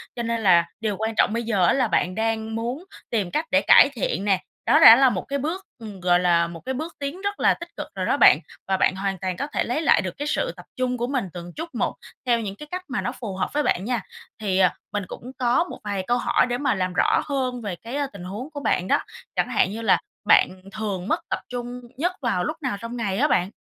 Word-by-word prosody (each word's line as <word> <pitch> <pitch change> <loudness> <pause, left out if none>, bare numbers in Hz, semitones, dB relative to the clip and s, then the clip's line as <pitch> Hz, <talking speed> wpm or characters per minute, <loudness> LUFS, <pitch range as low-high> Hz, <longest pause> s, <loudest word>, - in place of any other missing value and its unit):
Cho 235 - -3
nên 230 0 -1
là 170 -3 +5
điều 215 -3 -1
quan 220 +1 -2
trọng 215 - +3
bây 235 0 -1
giờ 200 -6 +2
á, - - +4
là 255 -4 +2
bạn 185 -2 0
đang 220 0 -1
muốn 245 +8 -3 0.3
tìm 205 -6 -1
cách 310 +2 0
để 285 +1 +4
cải 280 - +7
thiện 195 -5 -2
nè, 195 -3 +3 0.3
đó - - +5
đã 225 - +11
là 265 0 +5
một - - -3
cái 280 0 -2
bước, 340 +7 -3
ừm, 210 -4 -9
gọi 175 0 +3
là, 170 -1 +3
một 170 -1 -8
cái 265 - -2
bước 315 +6 -5
tiến 285 +7 -4
rất 405 0 -3
là - - +4
tích - - -9
cực - - -5
rồi - - -2
đó - - +1
bạn, - - +7 0.3
và 190 -1 +1
bạn 185 - +2
hoàn 195 0 -2
toàn 185 -2 -3
có 280 - -2
thể - - +1
lấy 245 +7 -1
lại 320 - +4
được 185 -2 -4
cái 290 +1 -3
sự - - 0
tập 180 - -12
trung 250 -1 0
của 240 +1 -2
mình 255 -5 -1
từng 175 0 -8
chút 330 +1 -7
một, - - -1 0.3
theo 240 -2 +3
những 200 -3 -4
cái 300 - -10
cách 365 0 -3
mà 250 - -2
nó 245 - -2
phù 220 -7 -6
hợp 190 - -1
với 295 0 +1
bạn 185 - 0
nha. 245 -2 -1 0.4
Thì, 190 -3 0
à, 185 -2 +4 0.2
mình 205 - -1
cũng 250 +2 -9
có 245 +5 +3
một 355 - -9
vài 200 -2 -2
câu 245 - +2
hỏi 245 - +2
để 245 0 -2
mà 280 -4 +1
làm 185 -1 -1
rõ - - +3
hơn 255 -4 -2
về 200 -4 -4
cái, 230 +9 -8
a, 285 -1 0
tình 185 -3 -9
huống 210 +10 -6
của 285 - -5
bạn 185 -9 0
đó. - - +3 0.4
Chẳng 250 - +1
hạn 205 -5 +2
như 225 +2 -5
là 225 - +4 0.3
bạn - - +6 0.2
thường 205 -3 -4
mất - - +1
tập - - -1
trung 245 0 -5 0.2
nhất 350 +5 +1
vào 205 -8 0
lúc 310 +1 -3
nào 250 -7 -2
trong 235 +1 -6
ngày 195 -4 -1
á - - +3
bạn? 180 +2 +1
230 Hz, 270 wpm, -24 LUFS, 190-260 Hz, 0.4 s, đã